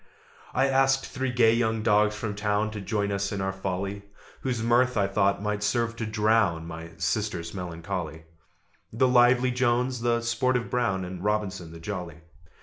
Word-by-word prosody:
I 135 - +4
asked 135 0 +3
three 130 0 -3
gay 115 -2 +4
young 115 -2 0
dogs 105 -1 +3
from 105 -1 -3
town 105 +1 0
To 105 -1 -6
join 100 0 -1
us 100 0 -1
in 100 - -3
our 95 0 -1
folly, 95 +1 -3 0.4
Whose 125 -4 -2
mirth, 120 +1 +3
I 100 - +3
thought, 100 0 +1
might 105 -1 -1
serve 115 +3 0
to 110 - -3
drown 105 -6 +2
My 80 0 -8
sister's 90 -2 -2
melancholy: 85 -3 -5 0.7
The 125 +4 +2
lively 125 0 +4
Jones, 125 0 +1
the 120 0 +1
sportive 120 +1 0
Brown, 95 -7 0
And 90 0 -7
Robinson 100 -5 -2
the 85 - -10
jolly. 85 -3 -6
105 Hz, 165 wpm, -27 LUFS, 95-120 Hz, 0.7 s, I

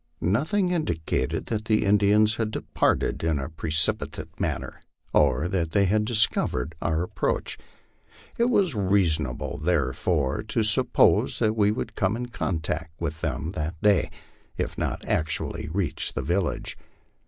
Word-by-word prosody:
Nothing 155 - +1
indicated 85 - -1
that 110 -1 -3
the 110 -1 +2
Indians 105 +2 +4
had 110 -2 0
departed 110 - 0
in 80 -2 +1
a 70 +1 -4
precipitate 80 0 -1
manner, - - -3 0.3
or 75 +2 +3
that 85 -4 -1
they 100 -1 +4
had 105 +3 +2
discovered 105 - +1
our 80 0 0
approach. - - -2 0.8
It 235 +1 +2
was 195 - +2
reasonable, 85 - 0
therefore, 75 -2 +1
to 110 +1 -1
sup 105 0 +1
pose - - +4
that 110 0 +1
we 105 -2 +3
would 110 0 -3
come 95 +1 0
in 120 +1 -5
contact 80 -6 -3
with 80 -1 -4
them 75 +4 -2
that 80 -2 -4
day, 105 -4 +4 0.5
if - - -2
not - - -3
actually 80 0 -2
reach 85 -4 -2
the 65 - -3
village. 85 +4 -1
90 Hz, 140 wpm, -26 LUFS, 80-110 Hz, 0.8 s, Indians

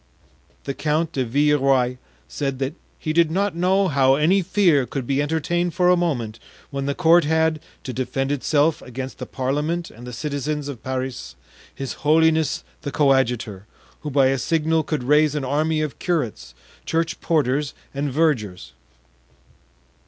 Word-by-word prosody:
The 140 - -3
Count 155 +3 0
de 130 - -1
Villeroy 135 -1 +2 0.3
said 135 - -3
that 135 +2 -2 0.2
"he 155 - -3
did 165 -1 +4
not 195 +2 0
know 190 +3 +2
how 135 -4 +4
any 170 +7 +3
fear 175 -8 +2
could 135 -3 -4
be 140 +2 +1
entertained 160 +3 -1
for 180 0 +3
a 180 - +6
moment, 120 -11 -2 0.3
when 140 0 -3
the 140 - -1
court 170 0 +5
had, 160 0 +2 0.2
to 130 - -5
defend 135 +2 -2
itself 145 +2 +1
against 130 +1 -7
the - - -6
parliament 150 +6 -2
and 120 +2 -12
the - - -6
citizens 145 +3 -3
of 140 -5 -7
Paris, 130 -1 -4 0.4
his 135 -2 -4
holiness 160 0 +3 0.2
the 145 - -4
coadjutor, 125 -8 +1 0.3
who 150 - -5
by 135 -2 +4
a 135 0 0
signal 160 +3 +1
could 155 -3 -3
raise 150 +2 +3
an 145 -3 -2
army 155 +3 0
of 150 -3 -4
curates, 110 - -2 0.3
church 165 0 -1
porters 145 -2 0 0.2
and 140 0 -2
vergers." 110 - 0
145 Hz, 155 wpm, -22 LUFS, 130-160 Hz, 0.4 s, a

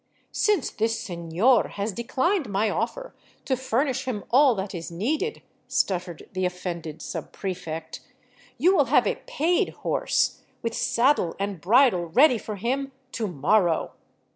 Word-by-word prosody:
" - - -39
Since 410 - +1
this 225 +1 0
sefior 175 +7 +1
has 205 +2 -3
declined 265 - 0
my 205 +2 +1
ofi'er - - -3 0.3
to 265 - +1
furnish 260 +2 -1
him 230 -6 -3
all 265 0 +6
that 195 0 -4
is 170 -2 -5
needed," 300 - -2 0.2
stuttered 180 -3 -1
the 185 0 -2
offended 170 -3 -4
subprefect, 165 -4 -5 0.3
" 250 0 -29
you 355 +10 +4
will - - +4
have - - +3
a - - -1
paid 350 -7 +1 0.2
horse, - - +1 0.2
with 230 -1 -2
saddle 235 - +2
and 195 -3 -3
bridle, 215 -3 +4
ready 250 - +5
for 215 - -6
him 265 +6 -2
— 260 -1 -41
to 225 -2 -2
morrow." 175 +2 +2
220 Hz, 150 wpm, -25 LUFS, 180-265 Hz, 0.3 s, all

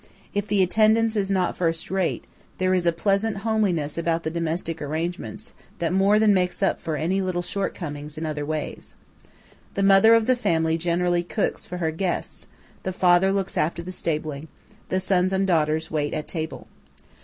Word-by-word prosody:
If 205 0 -1
the 200 -2 +3
attendance 220 +3 +3
is 200 -2 0
not 185 -2 +1
first 165 -1 -1
rate, 190 -2 -1 0.3
there 185 0 +1
is 180 -2 +1
a - - +5
pleasant 200 +5 0
homeliness 180 -9 0
about 165 0 0
the 160 - -2
domestic 165 0 -3
arrangements 170 +9 -4 0.2
that 170 -1 -1
more 195 +2 +4
than 215 -1 +5
makes 180 0 0
up 195 - +1
for 160 - -2
any 180 +6 0
little 180 -2 -1
shortcomings 155 -6 -4
in 160 - -3
other 150 -1 -3
ways. 155 0 -5 0.8
The 195 - 0
mother 195 +3 +7
of 225 -1 +3
the 255 - +3
family 165 -9 +1
generally 175 +1 +1
cooks 175 +4 -2
for 180 - -5
her 160 -2 0
guests; 175 +2 -3 0.3
the 185 - -3
father 180 +1 +4
looks 195 -1 -1
after 170 +2 -1
the 185 - -6
stabling; 155 -4 -3 0.4
the 185 - +1
sons 185 0 +1
and 190 0 +1
daughters 160 -3 +1
wait 150 -2 -1
at 150 - -4
table. 160 -2 -5
180 Hz, 180 wpm, -24 LUFS, 160-195 Hz, 0.8 s, mother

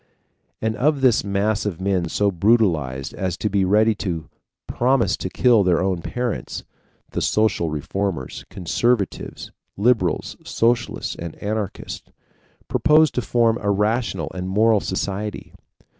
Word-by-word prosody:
And 110 0 0
of 145 +1 +2
this 125 -4 +4
mass 100 +1 0
of 100 -6 -3
men 95 -3 0
so 100 +3 +1
brutalized 85 - +1
as 90 -2 -3
to 105 - -2
be 100 -1 +2
ready 105 +4 +4
to 85 -6 -4 0.3
promise 130 0 +2
to - - -4
kill 120 -4 +4
their 90 -3 +3
own 95 -2 0
parents, 120 +4 -3 0.5
the - - -2
social 105 -6 +1
reformers 80 0 -3
conservatives, 100 +3 -1 0.3
liberals, 105 -5 +1
socialists, 120 +1 0
and 85 -1 -6
anarchists 105 -1 -4 0.6
propose 155 -1 +4
to 125 - -1
form 115 -1 +2
a 100 - -1
rational 100 -4 0
and 90 0 -4
moral 110 +2 +4
society. 100 +2 -4
100 Hz, 130 wpm, -22 LUFS, 90-115 Hz, 0.6 s, this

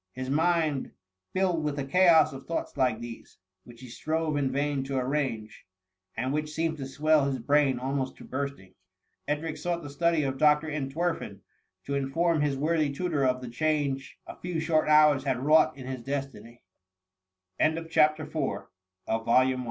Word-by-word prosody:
His 130 +1 -5
mind 160 -2 +1 0.4
filled 180 -4 0
with 150 -1 -2
a 140 - -1
chaos 170 0 +5
of 135 - -10
thoughts 165 - -3
like 130 -5 +1
these^ 120 -1 -9 0.3
which 120 0 -14
he 130 - -10
strove 155 +5 -2
in 140 -2 0
vain 140 0 -1
to 135 0 -3
arrange, 125 -7 -3 0.5
and 130 +4 -1
which 150 0 -2
seemed 160 0 -1
to 135 - -4
swell 150 +2 +2
his 135 -1 -1
brain 140 +1 +2
almost 130 +1 -2
to - - -13
bursting, 135 -9 -5 0.5
Edric 150 +1 -2
sought 170 +2 -3
the 145 - -8
study 165 +1 +1
of 135 -1 -3
Dr. 150 +1 +4
Entwerfen 155 +4 -3 0.4
to 140 - -3
inform 155 +4 +1
his 145 -2 0
worthy 155 0 +1
tutor 155 -1 -1
of 130 -1 +1
the 125 - -7
change 140 0 -1
a - - -9
few 175 -2 -3
short 160 -1 +1
hours 150 -3 +5
had 135 -3 0
wrought 150 +2 +4
in 130 - -9
his 130 -1 -5
d 135 -4 -5
145 Hz, 155 wpm, -28 LUFS, 135-155 Hz, 0.5 s, chaos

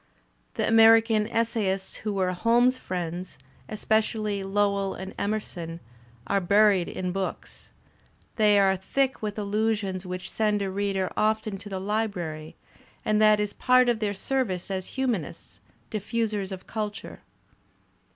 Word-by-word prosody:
The - - 0
American 225 -1 +5
essayists 215 -5 -1
who 215 - -3
were 185 -1 +1
Holmes's 240 +7 +3
friends, 180 0 -5 0.3
especially 215 -1 0
Lowell 200 0 0
and 190 0 -7
Emerson, 180 -6 -4 0.5
are 200 +7 +1
buried 200 -1 +4
id 180 -1 -3
books. 195 0 -5 0.7
They 210 -2 +4
are 195 -1 +4
thick 265 +8 -1
with 210 -1 -4
allusions 205 -2 -1
which 185 0 -5
send 210 -2 +1
a 195 - -2
reader 195 -1 -1
often 215 -2 0
to 205 - -10
the 190 -1 -4
library, 185 -7 -3 0.5
and 215 0 +2
that 215 -1 +6
is 210 -1 -1
part 255 -1 +4
of 235 -2 +1
their 205 -2 -1
service 195 -6 -2
as 190 -1 -3
humanists^ 245 - -3 0.3
diffusers 215 -2 -2
of 190 -1 -7
culture. 215 -1 -5
205 Hz, 130 wpm, -26 LUFS, 190-220 Hz, 0.7 s, that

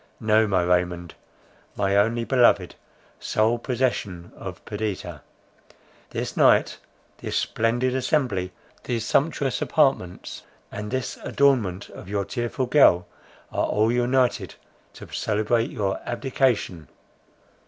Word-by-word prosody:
No, 110 0 +3
my 95 -3 +2
Raymond, 90 -1 0 0.6
my 100 -1 +1
only 115 +4 +2
beloved, 125 0 +3 0.5
sole 110 +2 +1
possession 115 -9 -2
of - - -9
Perdita! 100 -7 -4 0.9
This - - -4
night, - - +4 0.4
this - - -3
splendid 120 +3 0
assembly, 130 -8 0 0.3
these 115 -2 -2
sumptuous 140 -1 0
apartments, 135 - 0 0.3
and 105 +1 -5
this 130 +1 -3
adornment 115 -10 +1
of 95 - -11
your 100 -1 -1
tearful 120 +1 -2
girl, 120 -10 +5 0.5
are - - 0
all 110 +2 +2
united 120 -4 +1 0.4
to - - -11
celebrate 110 +2 0
your 100 -2 -2
abdication. 120 - -1
110 Hz, 110 wpm, -24 LUFS, 95-125 Hz, 0.9 s, girl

